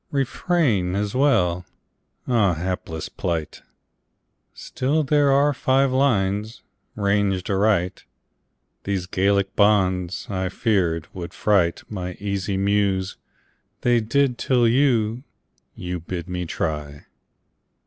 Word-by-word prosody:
"Refrain" 135 - 0
as 100 0 -2
well. 100 -11 +2 0.6
Ah, 105 -8 +2
Hapless 80 -2 -4
plight! 80 -4 -4 0.9
Still, 150 +5 -1
there 145 0 +3
are 145 +2 +3
five 135 0 +2
lines 110 -5 0 0.3
ranged 100 -2 0
aright. 95 -2 +1 0.8
These 95 -2 -2
Gallic 95 +1 0
bonds, 95 -3 +2
I 95 -2 -2
feared, 90 -6 0
would 90 0 -7
fright 95 -5 +1
My 90 -4 -5
easy 100 0 -3
Muse. 100 -1 0 0.6
They 120 -1 +3
did, 125 +2 +1
till 125 -3 +2
you 120 -2 +2 0.5
You 90 0 -5
bid 85 +1 -6
me 90 -1 -4
try! 75 -6 -4
100 Hz, 105 wpm, -23 LUFS, 90-120 Hz, 0.9 s, there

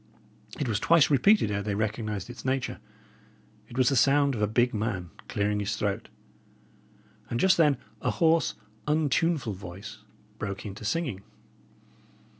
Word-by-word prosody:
It 145 - -1
was 105 -3 0
twice 165 +3 +4
repeated 140 - +4
ere 100 0 -1
they 100 0 -2
recognised 105 -2 -2
its 120 +1 -10
nature. 130 -1 -1 0.9
It 120 - -9
was 130 +1 +4
the 140 - +1
sound 140 +2 +4
of 110 - -3
a 105 - +3
big 120 +3 +2
man 105 -6 -2 0.2
clearing 105 0 0
his 105 +1 -1
throat; 105 +1 -2 1.2
and 115 - -2
just 190 +7 +5
then 150 -5 +4 0.2
a - - 0
hoarse, 165 -1 +2 0.3
untuneful 150 -4 +1
voice 95 +2 -9 0.4
broke 100 -1 -4
into 105 +1 -7
singing. 125 - -1
115 Hz, 145 wpm, -28 LUFS, 105-140 Hz, 1.2 s, just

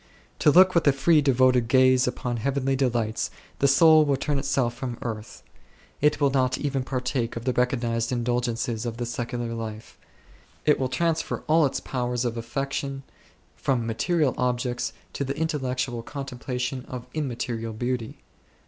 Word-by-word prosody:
To - - +5
look 185 +4 +7
with 170 -3 +2
a - - +8
free 150 +3 +3
devoted 130 -3 +3
gaze 130 +1 +4
upon 120 -3 -2
heavenly 135 +2 0
delights, 120 -4 0 0.3
the 140 - +4
soul 155 +3 +7
will 145 -2 +2
turn 145 0 -1
itself 135 -3 0
from 120 -1 -5
earth; 110 -3 -6 0.6
it 150 0 +3
will 140 -2 +3
not 130 -1 +1
even 135 -2 -1
partake 125 -2 -2
of 115 0 -6
the 130 - +1
recognized 120 -2 0
indulg 120 0 0
ences 115 -1 -3
of 115 -1 -4
the 120 - -2
secular 120 0 -3
life; 110 -1 -7 0.7
it 150 - +4
will 130 -1 0
transfer 165 +5 -1
all 155 -1 +4
its 135 - -3
powers 125 -1 -2
of 120 -1 -1
affection 135 +3 -3 0.5
from 125 -4 0
material 145 +5 +1
objects 125 -1 -1 0.2
to - - -2
the 140 +1 -4
intellectual 130 -6 -2
contemplation 125 -1 -4
of 125 -1 -7
immaterial 120 -6 -3
beauty. 120 0 -3
125 Hz, 155 wpm, -25 LUFS, 120-140 Hz, 0.7 s, a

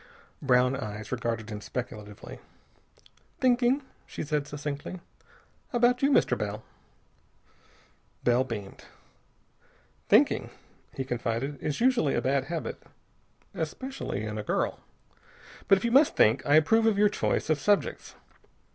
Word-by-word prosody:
Brown 125 -1 +3
eyes 105 -3 -6
regarded 115 -3 -3
him 105 0 -6
speculatively. 105 -4 -7 1.0
"Thinking," 250 +2 +3 0.2
she - - -5
said 150 -1 -1
succinctly. 145 +4 -5 0.7
"About 245 +1 +3
you, 275 - +4
Mr. 285 - +3
Bell." 105 +1 -4 1.6
Bell 125 +1 +3
beamed. 105 -6 -7 1.2
"Thinking," - - +4 0.5
he 135 - -2
confided, 125 +3 -3
"is 150 -2 -2
usually 245 - +3
a - - +2
bad 135 0 +1
habit, 165 +2 -5 0.7
especially 260 - -4
in 105 0 -4
a - - -4
girl. - - -1 0.9
But 195 - +6
if 190 - -4
you 235 - +1
must 280 +4 +5
think, 110 +5 +4
I 145 - +5
approve 225 +9 +4
of 215 -3 +2
your 210 +1 +5
choice 200 - -1
of 155 - +2
subjects. 205 +5 0
140 Hz, 125 wpm, -28 LUFS, -, 1.6 s, But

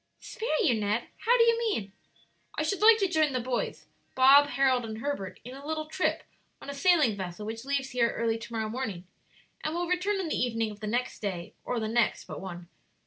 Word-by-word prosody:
"Spare 440 -9 -2
you, 265 - +4
Ned? 210 +3 -1 0.2
How 485 +2 +6
do 465 - +6
you 465 0 +3
mean?" 405 - -1 0.6
"I 310 - 0
should 375 +5 -1
like 440 +1 +8
to 395 -3 +1
join 315 -5 +2
the 255 - 0
boys 245 0 -3 0.3
Bob, 275 +2 +7
Harold, 260 -2 +2
and 220 -1 -6
Herbert 230 -7 -4
in 250 - -9
a 275 +1 -10
little 310 +1 -3
trip 340 +4 -1 0.4
on 280 - -7
a - - -6
sailing 300 - +3
vessel 190 +1 -6
which 225 +3 -6
leaves 275 -1 -1
here 235 -2 +2
early 225 -1 0
to 235 +1 -10
morrow 220 -1 -2
morning 215 -6 -4 0.6
and 310 +1 -2
will 350 +1 -1
return 365 +3 0
on 370 - -2
the - - 0
evening 225 -3 0
of 210 - -11
the 215 - -5
next 245 +4 -2
day 185 -5 -4
or 245 - -2
the 220 - -2
next 230 0 +1
but - - -7
one. 175 -2 -8
255 Hz, 220 wpm, -28 LUFS, 220-310 Hz, 0.6 s, like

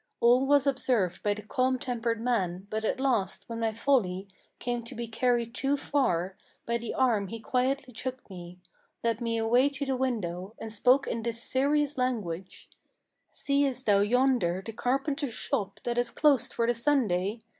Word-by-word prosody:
All 245 +3 +4
was 285 -1 +4
observed 245 -9 +1
by 205 -1 +1
the 210 - -9
calm 255 +4 +1
tempered 235 -3 -2
man; 195 -6 -1
but 220 0 -2
at 220 - -1
last 235 -8 0
when 230 -1 -5
my 225 -1 +1
folly 215 -6 +1 0.3
Came 240 -1 -2
to - - -8
be 235 0 -4
carried 235 0 0
too 275 +3 0
far, 190 -11 0 0.3
by 235 0 0
the 235 -1 -5
arm 230 -7 +2
he 230 +4 -6
quietly 255 +2 -1
took 260 +3 -5
me, 180 -2 -10 0.5
Led 230 0 0
me 230 -1 -1
away 240 +5 +3
to 280 0 -4
the 270 -1 0
window, 210 -6 -2
and 220 -1 -7
spoke 250 +5 +4
in 230 - -3
this 230 0 -4
serious 285 +1 +1
language: 195 -8 -3 0.6
'Seest 280 -2 0
thou 205 -2 +4
yonder 215 -5 +2
the 225 - -6
carpenter's 275 +3 -1
shop 195 - -2
that 240 0 0
is 245 - 0
closed 290 -5 +3
for 230 - 0
the 240 - +2
Sunday? 225 -5 +1
235 Hz, 175 wpm, -28 LUFS, 215-260 Hz, 0.6 s, All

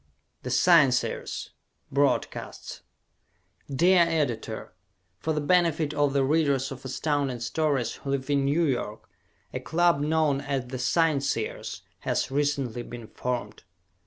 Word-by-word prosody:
"The 125 - -5
Scienceers" 135 -2 +3 0.4
Broadcasts 140 +1 -1 0.9
Dear 175 +6 +4
Editor: 140 -10 -1 0.5
For 160 - -1
the 150 -1 0
benefit 160 -1 +2
of 145 -2 +1
the 140 -1 +3
readers 140 -2 +1
of 135 -1 -8
Astounding 135 -1 -1
Stories 130 +1 -1
who 140 - -7
live 135 -1 -1
in 140 -1 +2
New 150 +5 +2
York, 120 -6 -2 0.5
a - - -2
club 170 +3 +2
known 150 -2 +1
as 140 -3 -2
The 130 +1 -6
Scienceers 140 -4 0 0.2
has - - -1
recently 140 -4 0
been 120 -1 -8
formed. 120 -3 -4
140 Hz, 125 wpm, -27 LUFS, 125-155 Hz, 0.9 s, Dear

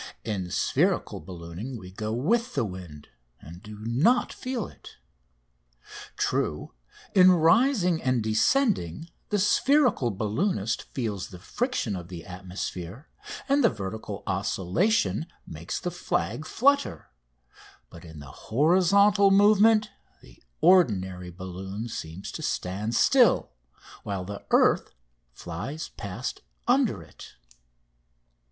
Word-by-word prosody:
In 95 -4 -3
spherical - - 0
ballooning 90 +9 -8
we 90 -3 -11
go 110 +3 -4
with 220 - 0
the 130 -5 +1
wind, 90 -7 -9 0.3
and 85 +3 -12
do 105 -1 -10
not 145 - +2
feel 255 -5 -4
it. - - -14 1.2
True, 75 -4 -1 0.4
in 185 -1 +7
rising 180 - +3
and 130 -3 +1
descending 160 - +1 0.2
the 210 - +1
spherical 235 - +3
balloonist 110 - -2
feels 110 -7 -3
the 90 - -11
friction 120 - -2
of 90 -2 -7
the 85 -2 -9
atmosphere, 95 - -7 0.4
and 280 0 +3
the - - +6
vertical 105 -1 -6
oscillation 100 - 0 0.2
makes 80 +3 -5
the 180 - -3
flag 175 -2 -2
flutter, 280 - +1 0.8
but 85 - -12
in 80 -2 -11
the 70 -3 -10 0.2
horizontal 190 - +4
movement 210 +2 +5 0.3
the - - -18 0.2
ordinary 95 - +3
balloon 95 +4 -7
seems 85 -4 -7
to - - -7
stand 105 +5 -2
still, 245 - +4 0.5
while 100 -3 -4
the 100 +1 -7
earth - - +3 0.4
flies 95 - -6
past 105 +3 -6 0.3
under - - +2
it. - - -14
110 Hz, 115 wpm, -26 LUFS, -, 1.2 s, in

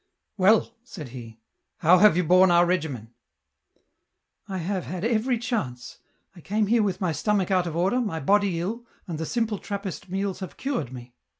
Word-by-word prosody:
" - - -56
Well," 215 +4 +4
said 160 - -9
he, 115 -3 -10 0.2
" - - -55
how 175 +3 +6
have 205 -4 +6
you 180 - +2
borne 185 +3 +5
our 175 0 +5
regimen? 145 -10 -2 0.4
" - - -46
" - - -51
I 190 - -3
have 185 +1 -3
had 185 +2 -4
every 235 +2 +1
chance; 210 - -4 0.4
I 175 - -13
came 210 +5 0
here 225 +2 +3
with 195 -4 -1
my 180 -3 +1
stomach 195 +5 0
out 180 -2 +2
of 165 - -5
order, 190 +9 +1
my 200 -9 -3
body 195 +2 +2
ill, 230 +7 -4 0.2
and 165 -4 -5
the 160 - -3
simple 225 -4 -1
Trappist 200 -2 -6
meals 195 0 -2
have 185 - -8
cured 260 - -3
me." 125 -1 -10
185 Hz, 200 wpm, -25 LUFS, 165-210 Hz, 0.4 s, how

